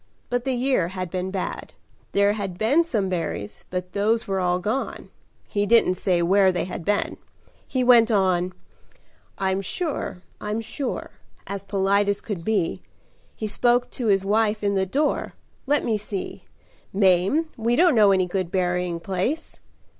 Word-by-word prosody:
But 245 Hz, 0 st, -1 dB
the 265 Hz, -, 0 dB
year 250 Hz, -8 st, +1 dB
had 185 Hz, -1 st, -5 dB
been 185 Hz, 0 st, -2 dB
bad. 190 Hz, -1 st, -4 dB, 0.4 s
There 200 Hz, +1 st, +4 dB
had 195 Hz, -4 st, -4 dB
been 265 Hz, -, +3 dB
some 220 Hz, -12 st, -1 dB
berries 155 Hz, -, -4 dB
but 180 Hz, 0 st, -4 dB
those 220 Hz, +3 st, +1 dB
were 195 Hz, -1 st, 0 dB
all 180 Hz, -1 st, +1 dB
gone. 215 Hz, +9 st, -3 dB, 0.4 s
He 205 Hz, -1 st, -1 dB
didn't 230 Hz, -4 st, +5 dB
say 180 Hz, -1 st, +1 dB
where 190 Hz, +2 st, +4 dB
they 180 Hz, -, -1 dB
had 180 Hz, -, -6 dB
been. 205 Hz, +4 st, 0 dB, 0.5 s
He 255 Hz, -1 st, 0 dB
went 240 Hz, -2 st, +6 dB
on: 185 Hz, -4 st, +2 dB, 0.8 s
'I'm 190 Hz, 0 st, 0 dB
sure 195 Hz, -, -3 dB, 0.2 s
I'm 210 Hz, +1 st, -2 dB
sure' 260 Hz, +4 st, -5 dB, 0.3 s
as 200 Hz, 0 st, -6 dB
polite 200 Hz, +1 st, +2 dB
as 200 Hz, 0 st, 0 dB
could 195 Hz, -7 st, -5 dB
be. 200 Hz, -5 st, 0 dB, 0.5 s
He 220 Hz, -, -4 dB
spoke 240 Hz, +3 st, +1 dB
to 240 Hz, -, -3 dB
his 195 Hz, -2 st, +3 dB
wife 215 Hz, +1 st, +1 dB
in 200 Hz, 0 st, +2 dB
the 190 Hz, -1 st, +1 dB
door, 290 Hz, +9 st, 0 dB, 0.3 s
'Let 290 Hz, +1 st, +2 dB
me 220 Hz, -2 st, +1 dB
see, 200 Hz, -2 st, -6 dB, 0.5 s
Mame, 195 Hz, -, +3 dB
we 230 Hz, +1 st, +1 dB
don't 345 Hz, +2 st, +5 dB
know 210 Hz, -3 st, +6 dB
any 190 Hz, -1 st, +3 dB
good 180 Hz, -1 st, -2 dB
berrying 180 Hz, -2 st, 0 dB
place?' 195 Hz, -, -3 dB
200 Hz, 160 wpm, -24 LUFS, 185-225 Hz, 0.8 s, went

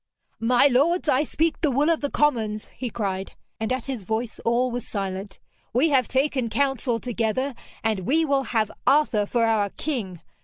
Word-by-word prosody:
'My 245 Hz, +3 st, +4 dB
lords, 290 Hz, +7 st, +3 dB
I 280 Hz, 0 st, +3 dB
speak 320 Hz, +2 st, -1 dB
the 310 Hz, -, +3 dB
will 285 Hz, +5 st, +2 dB
of 330 Hz, -, 0 dB
the 285 Hz, -, -1 dB
commons,' 220 Hz, -9 st, 0 dB
he 250 Hz, -, -5 dB
cried, 195 Hz, -4 st, -3 dB, 0.3 s
and 220 Hz, +2 st, -2 dB
at 255 Hz, -2 st, -1 dB
his 265 Hz, -5 st, -4 dB
voice 220 Hz, +4 st, -3 dB
all 245 Hz, +2 st, +1 dB
were 245 Hz, -, -2 dB
silent. 195 Hz, -3 st, -5 dB, 0.4 s
'We 265 Hz, +8 st, +3 dB
have 260 Hz, -4 st, +3 dB
taken 265 Hz, -3 st, 0 dB
counsel 250 Hz, -1 st, 0 dB
together, 245 Hz, +3 st, -1 dB, 0.3 s
and 220 Hz, -3 st, +1 dB
we 290 Hz, -, +1 dB
will 275 Hz, -2 st, +1 dB
have 220 Hz, -2 st, 0 dB, 0.2 s
Arthur 270 Hz, -8 st, +3 dB
for 235 Hz, +1 st, +2 dB
our 215 Hz, -3 st, +2 dB
King. 205 Hz, -, -4 dB
245 Hz, 180 wpm, -24 LUFS, 220-280 Hz, 0.4 s, My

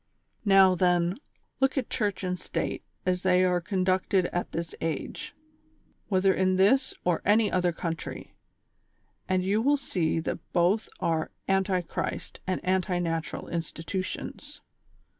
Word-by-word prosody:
Now, 195 Hz, -2 st, +7 dB
then, 180 Hz, +2 st, +2 dB, 0.4 s
look 270 Hz, +1 st, +2 dB
at 255 Hz, -, -1 dB
Church 205 Hz, -5 st, -1 dB
and 180 Hz, -1 st, -2 dB
State -, -, -3 dB, 0.2 s
as 180 Hz, -1 st, +1 dB
they 185 Hz, -1 st, +4 dB
are 180 Hz, -1 st, +2 dB
con 185 Hz, +1 st, -1 dB
ducted 185 Hz, 0 st, +2 dB
at 175 Hz, -, -2 dB
this 170 Hz, 0 st, -4 dB
age, 160 Hz, -3 st, -4 dB, 0.7 s
whether 190 Hz, -1 st, +3 dB
in 185 Hz, 0 st, +2 dB
this 260 Hz, +8 st, +3 dB
or 175 Hz, -2 st, +1 dB
any 210 Hz, +1 st, +4 dB
other 180 Hz, -1 st, +2 dB
country, 165 Hz, -1 st, -5 dB, 1.0 s
and 185 Hz, -1 st, +2 dB
you 200 Hz, +4 st, +2 dB
will 285 Hz, +4 st, +3 dB
see 170 Hz, -, -1 dB
that 165 Hz, -, -3 dB
both 180 Hz, +5 st, +2 dB
are 160 Hz, -1 st, 0 dB, 0.2 s
anti 190 Hz, -1 st, +2 dB
Christ 175 Hz, -, -5 dB
and 185 Hz, -, -2 dB
anti 185 Hz, 0 st, +1 dB
natural 165 Hz, -2 st, -2 dB
institutions. 170 Hz, +3 st, -5 dB
185 Hz, 140 wpm, -28 LUFS, 175-195 Hz, 1.0 s, Now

